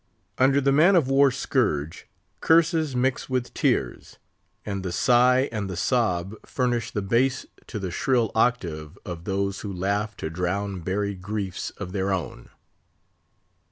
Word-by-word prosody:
Under 135 Hz, +2 st, +4 dB
the 140 Hz, 0 st, +2 dB
man 165 Hz, +8 st, +5 dB
of 155 Hz, -7 st, +3 dB
war 135 Hz, +1 st, +5 dB
scourge, 105 Hz, -, -1 dB, 0.3 s
curses 160 Hz, -3 st, +3 dB
mix 130 Hz, +2 st, 0 dB
with 125 Hz, -1 st, -2 dB
tears; -, -, -1 dB, 0.5 s
and 100 Hz, -2 st, -3 dB
the 90 Hz, -, -3 dB
sigh 125 Hz, +7 st, +4 dB
and 105 Hz, -4 st, -3 dB
the 90 Hz, -, -5 dB
sob 95 Hz, -5 st, 0 dB
furnish 120 Hz, -4 st, -1 dB
the 105 Hz, -, -3 dB
bass 125 Hz, +6 st, +1 dB, 0.2 s
to 110 Hz, -, -5 dB
the 95 Hz, -3 st, -4 dB
shrill 120 Hz, +1 st, +1 dB
octave 85 Hz, -11 st, -1 dB
of 85 Hz, -1 st, -7 dB
those 100 Hz, 0 st, -1 dB
who 100 Hz, -, -5 dB
laugh 100 Hz, +3 st, -2 dB
to 80 Hz, -, -4 dB
drown 90 Hz, +3 st, -2 dB
buried 95 Hz, +2 st, -2 dB
griefs 100 Hz, -2 st, -4 dB
of 95 Hz, -3 st, -6 dB
their 95 Hz, 0 st, -1 dB
own. 85 Hz, -10 st, -4 dB
105 Hz, 150 wpm, -25 LUFS, 95-130 Hz, 0.5 s, man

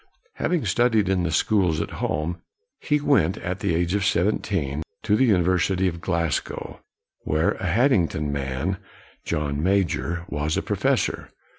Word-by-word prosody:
Having 175 Hz, -4 st, 0 dB
studied 115 Hz, -4 st, +2 dB
in 95 Hz, -2 st, +2 dB
the 85 Hz, -, 0 dB
schools 90 Hz, -1 st, +2 dB
at -, -, -3 dB
home, 85 Hz, +3 st, -2 dB, 0.4 s
he 150 Hz, 0 st, +1 dB
went, 110 Hz, -, +2 dB
at 90 Hz, -1 st, -4 dB
the 85 Hz, -, 0 dB
age 85 Hz, +1 st, 0 dB
of 100 Hz, -1 st, +1 dB
seventeen, 85 Hz, -6 st, 0 dB, 0.2 s
to 105 Hz, -2 st, +2 dB
the 130 Hz, -, +4 dB
University 95 Hz, -2 st, +2 dB
of 85 Hz, -2 st, -4 dB
Glasgow, 85 Hz, -3 st, -2 dB, 0.4 s
where 80 Hz, +2 st, +1 dB
a 95 Hz, -, -4 dB
Hadding 105 Hz, -, +3 dB
ton 75 Hz, -2 st, -3 dB
man, 70 Hz, +6 st, -2 dB, 0.5 s
John 75 Hz, -1 st, -2 dB
Major, 85 Hz, -2 st, 0 dB
was 75 Hz, +2 st, -1 dB
a -, -, -1 dB
professor. -, -, 0 dB
90 Hz, 150 wpm, -24 LUFS, 80-100 Hz, 0.5 s, the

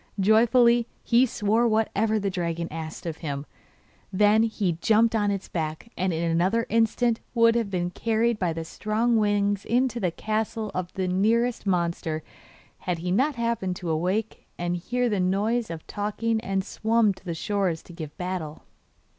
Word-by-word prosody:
Joyfully 235 Hz, +3 st, +4 dB, 0.2 s
he 245 Hz, +2 st, +4 dB
swore 220 Hz, +2 st, +1 dB
whatever 220 Hz, 0 st, +1 dB
the 200 Hz, -2 st, -1 dB
dragon 170 Hz, -2 st, -2 dB
asked 160 Hz, +1 st, -7 dB
of 165 Hz, -2 st, -4 dB
him; 140 Hz, -3 st, -4 dB, 0.7 s
then 210 Hz, +3 st, +4 dB
he 200 Hz, -7 st, 0 dB
jumped 225 Hz, +1 st, +4 dB
on 205 Hz, -2 st, +2 dB
his 195 Hz, -1 st, -3 dB
back, 160 Hz, +6 st, -4 dB
and 185 Hz, 0 st, 0 dB
in 165 Hz, 0 st, -2 dB
another 190 Hz, +8 st, +2 dB
instant 230 Hz, +1 st, +2 dB, 0.2 s
would 230 Hz, 0 st, +5 dB
have 230 Hz, -3 st, 0 dB
been 175 Hz, -2 st, -2 dB
carried 230 Hz, +2 st, 0 dB
by 180 Hz, -3 st, +1 dB
the 165 Hz, 0 st, -5 dB
strong 220 Hz, +7 st, 0 dB
wings 205 Hz, -1 st, +1 dB
into 245 Hz, 0 st, +1 dB
the 185 Hz, -, +1 dB
castle 215 Hz, +3 st, -3 dB
if 180 Hz, -1 st, -3 dB
the 185 Hz, -1 st, -1 dB
nearest 220 Hz, +5 st, +1 dB
monsters 170 Hz, -3 st, -1 dB, 0.6 s
had 180 Hz, -2 st, -3 dB
not 270 Hz, +8 st, +2 dB
happened 230 Hz, -6 st, -1 dB
to 175 Hz, -2 st, -4 dB
awake 185 Hz, +7 st, -2 dB
and 175 Hz, 0 st, -1 dB
hear 245 Hz, +8 st, -1 dB
the 210 Hz, -4 st, 0 dB
noise 210 Hz, +6 st, 0 dB
of 165 Hz, -2 st, -7 dB
talking 220 Hz, +2 st, -2 dB
and 195 Hz, -3 st, -1 dB
swum 220 Hz, 0 st, +1 dB
to -, -, -19 dB
the 170 Hz, -3 st, -4 dB
shore 200 Hz, +1 st, 0 dB
to 170 Hz, +2 st, -14 dB
give 155 Hz, -3 st, -8 dB
battle. 180 Hz, -4 st, -4 dB
205 Hz, 165 wpm, -26 LUFS, 175-230 Hz, 0.7 s, would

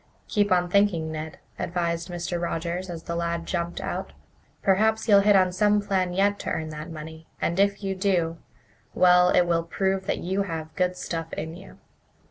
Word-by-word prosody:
"Keep 205 Hz, -2 st, +1 dB
on 180 Hz, -1 st, +3 dB
thinking, 175 Hz, -4 st, +2 dB
Ned," 155 Hz, 0 st, -6 dB, 0.2 s
advised 170 Hz, 0 st, -2 dB
Mr. 175 Hz, 0 st, -3 dB
Rogers, 170 Hz, +2 st, -3 dB
as 165 Hz, -2 st, -6 dB
the 170 Hz, -, -4 dB
lad 170 Hz, 0 st, -2 dB
jumped 170 Hz, -1 st, -3 dB
out. -, -, -4 dB, 0.5 s
"Perhaps 220 Hz, +3 st, +2 dB
you'll 205 Hz, -2 st, +7 dB
hit 205 Hz, +1 st, +5 dB
on 185 Hz, -1 st, +4 dB
some 210 Hz, +3 st, +3 dB
plan 190 Hz, -3 st, 0 dB
yet 200 Hz, +2 st, +1 dB
to -, -, -4 dB
earn 160 Hz, 0 st, -2 dB
that 155 Hz, +2 st, -7 dB
money, 160 Hz, 0 st, -9 dB
and 170 Hz, +3 st, -1 dB
if 200 Hz, 0 st, +2 dB
you 195 Hz, -1 st, -1 dB
do 180 Hz, -4 st, 0 dB, 0.6 s
well, 180 Hz, 0 st, +6 dB
it 180 Hz, -, +4 dB
will 170 Hz, -1 st, +2 dB
prove 190 Hz, +3 st, -1 dB
that -, -, 0 dB
you 190 Hz, +3 st, -1 dB
have 160 Hz, -4 st, -5 dB
good 180 Hz, 0 st, 0 dB
stuff 165 Hz, -2 st, -4 dB
in 160 Hz, +2 st, -5 dB
you." 190 Hz, +2 st, -13 dB
180 Hz, 185 wpm, -25 LUFS, 165-195 Hz, 0.6 s, you'll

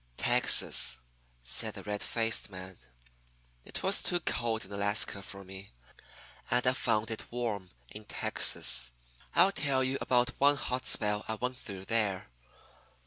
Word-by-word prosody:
"Texas," -, -, +3 dB, 0.5 s
said -, -, -1 dB
the -, -, -8 dB
red 105 Hz, 0 st, -4 dB
faced 115 Hz, -2 st, -1 dB
man. 95 Hz, -1 st, -9 dB, 0.9 s
"It -, -, -7 dB
was 195 Hz, +2 st, +6 dB
too 175 Hz, -, +4 dB
cold 115 Hz, -, -2 dB
in 95 Hz, -, -15 dB
Alaska 100 Hz, 0 st, -1 dB
for 100 Hz, 0 st, -9 dB
me. 95 Hz, -2 st, -11 dB, 0.8 s
And 125 Hz, -, +1 dB
I 125 Hz, -, +4 dB
found 110 Hz, -4 st, -1 dB
it 110 Hz, -, -6 dB
warm 110 Hz, -6 st, -3 dB, 0.2 s
in 105 Hz, -, -11 dB
Texas. 60 Hz, -10 st, +1 dB, 0.4 s
I'll 195 Hz, -, +5 dB
tell 140 Hz, -7 st, 0 dB
you 130 Hz, +1 st, -1 dB
about 125 Hz, -1 st, +2 dB
one 145 Hz, +1 st, +5 dB
hot 130 Hz, -2 st, -3 dB
spell 105 Hz, -1 st, +4 dB
I 110 Hz, -, -2 dB
went 125 Hz, +3 st, -3 dB
through 95 Hz, -5 st, -9 dB
there. 100 Hz, -, -1 dB
110 Hz, 145 wpm, -30 LUFS, 100-125 Hz, 0.9 s, was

